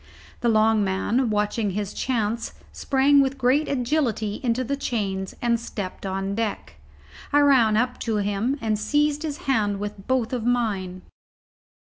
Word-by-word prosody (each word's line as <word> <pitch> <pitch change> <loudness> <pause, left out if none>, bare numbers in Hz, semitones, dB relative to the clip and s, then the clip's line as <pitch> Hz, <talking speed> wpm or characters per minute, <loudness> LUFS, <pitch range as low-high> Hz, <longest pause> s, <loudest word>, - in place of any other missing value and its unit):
The 240 - +1
long 220 -1 +3
man, 210 +6 0
watching 210 0 0
his 200 +1 -3
chance, 230 -2 -2 0.2
sprang 280 +1 +3
with 270 0 0
great 265 +4 +2
agility 245 -6 -1
into 250 0 0
the 275 +3 -2
chains, 195 -8 -3
and 235 -1 +2
stepped 200 -4 -6
on 195 +1 -2
deck. 220 -1 -3 0.5
I 290 - +5
ran 245 -7 +5
up 250 +2 0
to 225 -2 -1
him 205 +6 0
and 215 -2 0
seized 295 +5 +1
his 305 -3 -3
hand 210 -7 +1
with 205 -1 -6
both 255 -2 0
mine. 210 -6 -1
230 Hz, 145 wpm, -24 LUFS, 205-260 Hz, 0.5 s, I